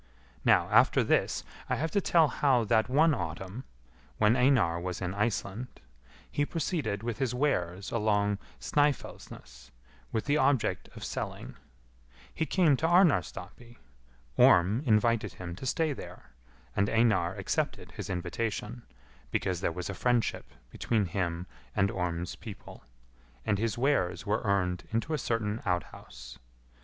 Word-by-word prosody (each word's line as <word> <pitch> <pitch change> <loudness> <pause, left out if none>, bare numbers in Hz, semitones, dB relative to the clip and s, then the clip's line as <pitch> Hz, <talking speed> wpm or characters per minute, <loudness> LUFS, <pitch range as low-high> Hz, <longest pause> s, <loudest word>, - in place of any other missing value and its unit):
Now - - +4
after - - +5
this, - - +1 0.3
I - - +2
have 160 +2 -2
to 200 - +2
tell 165 -3 +4
how 135 -5 +2
that 110 +1 +2
one 155 +4 +4
autumn, 95 - -5 0.5
when 105 +3 +4
Einar 125 -10 +3
was 90 0 -4
in 90 -1 -3
Iceland, 105 +2 -3 0.5
he 145 - +1
proceeded 145 - -2
with 115 -2 -3
his 125 -3 0
wares 95 -9 -1
along 105 -2 +1 0.2
Snœfellsnes, 65 - -2 0.4
with 110 - -2
the 145 +1 +2
object 140 -5 +1
of - - -9
selling; - - -5 0.8
he 160 - -2
came 170 -7 +4
to 160 - +1
Arnarstapi; 120 - +1 0.6
Orm 95 +8 +5
invited 110 -2 +2
him 85 -2 -7
to 130 - -6
stay 155 +2 +1
there, - - -11 0.4
and 100 +1 +2
Einar 110 -6 +2
accepted 100 -2 -2
his - - -7
invitation, 105 +6 -3 0.5
because 90 -2 -1
there 85 - 0
was 90 +1 -5
friendship 120 -2 0 0.2
between 110 -4 0
him 85 -1 -2 0.3
and 100 0 +2
Orm's 90 -1 -3
people, 110 - -11 0.6
and 100 -2 +1
his 115 -1 -1
wares 100 -10 +1
were 105 +2 0
earned 90 -4 0
into 115 +8 -1
a 155 - 0
certain 110 -1 -1
outhouse. 65 -8 -5
110 Hz, 135 wpm, -29 LUFS, 90-130 Hz, 0.8 s, after